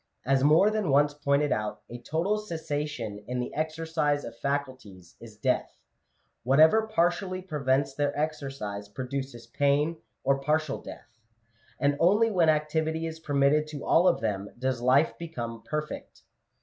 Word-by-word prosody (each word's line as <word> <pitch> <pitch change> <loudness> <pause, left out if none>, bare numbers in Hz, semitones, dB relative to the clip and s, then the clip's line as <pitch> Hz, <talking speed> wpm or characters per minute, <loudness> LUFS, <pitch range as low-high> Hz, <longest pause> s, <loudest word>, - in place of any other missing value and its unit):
As 135 +1 +2
more 160 +8 +5
than 215 -6 -1
once 145 +1 +4
pointed 145 0 +1
out, 105 0 -2
a 120 - -8
total 180 +10 0
cessation 145 - -4
in 125 0 -2
the 125 - -4
exercise 155 -1 -1
of 115 - -8
faculties 130 -10 -4
is - - -12
death; - - -1 0.6
whatever 160 - +5
partially 185 -1 0
prevents 140 -6 0
their 145 0 0
exercise, 135 -10 -4
produces 130 +1 -5
pain 145 +6 +1 0.3
or 135 0 +2
partial 150 0 0
death; - - -10 0.7
and 145 0 +2
only 210 +7 +4
when 175 -5 +3
activity 160 +1 0
is 160 0 -6
permitted 145 0 +2
to 150 -2 -7
all 175 +3 +4
of 175 - +3
them, 100 -2 -2
does 130 -1 -1
life 130 +5 +3
become 120 -9 -6
perfect. 150 0 -6
145 Hz, 145 wpm, -28 LUFS, 130-160 Hz, 0.7 s, more